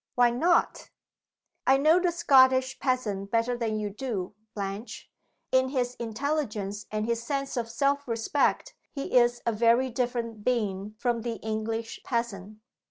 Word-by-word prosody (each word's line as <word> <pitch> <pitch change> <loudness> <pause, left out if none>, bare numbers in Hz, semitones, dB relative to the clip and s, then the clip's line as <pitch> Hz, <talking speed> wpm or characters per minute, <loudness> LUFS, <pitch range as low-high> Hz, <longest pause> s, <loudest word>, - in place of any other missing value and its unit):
"Why 245 -1 +5
not?" 335 +8 +1 0.8
"I 265 +1 +6
know 310 +5 +5
the 355 -1 +1
Scottish 260 -5 +4
peasant 210 -7 -1
better 230 +3 +1
than 225 -3 -2
you 210 -1 -3
do, 210 -4 -4 0.2
Blanche. 200 +3 -6 0.4
In 260 0 +3
his 250 -2 -1
intelligence 220 -5 -3
and 215 0 -2
his 235 0 -1
sense 275 +1 -3
of 235 -2 -2
self 280 +4 0
respect 230 +5 0 0.2
he 275 -2 -5
is 240 -1 +4
a 235 - +2
very 235 +4 +3
different 235 -3 -2
being 210 -4 -1
from 240 0 0
the 235 0 -3
English 220 +1 -3
peasant. 215 -4 -3
235 Hz, 145 wpm, -27 LUFS, 215-260 Hz, 0.8 s, I